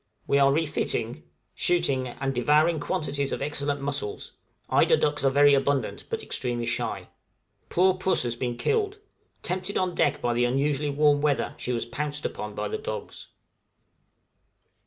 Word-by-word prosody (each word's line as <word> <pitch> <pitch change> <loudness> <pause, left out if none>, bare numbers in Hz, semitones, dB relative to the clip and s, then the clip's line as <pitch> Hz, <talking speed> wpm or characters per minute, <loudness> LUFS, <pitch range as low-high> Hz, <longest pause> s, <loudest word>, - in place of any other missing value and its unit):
We 140 - +3
are 140 0 +5
refitting, 155 +1 -1 0.3
shooting, 140 -8 +1
and 135 +2 -3
devouring 150 +6 +3
quantities 140 -1 -1
of - - -2
excellent 145 0 -2
mussels; 140 -6 -4 0.4
eider - - +4
ducks 145 -2 0
are 135 - +5
very 145 +1 +5
abundant, 140 0 0
but - - -3
extremely 120 -2 -2
shy. - - -3 0.6
Poor 185 +2 +4
puss 185 -3 +1
has 120 -1 -2
been 120 -1 -3
killed; 420 - 0 0.5
tempted 185 +2 -2
on 185 -1 0
deck 145 - +1
by 120 -3 0
the 120 +1 +2
unusually 140 +3 0
warm 145 0 +3
weather, 145 -2 +1
she 125 - -3
was 120 -2 -1
pounced 145 +4 -2
upon 105 -1 -4
by - - -2
the 440 - -3
dogs. 485 +3 -6
145 Hz, 155 wpm, -26 LUFS, 130-155 Hz, 0.6 s, are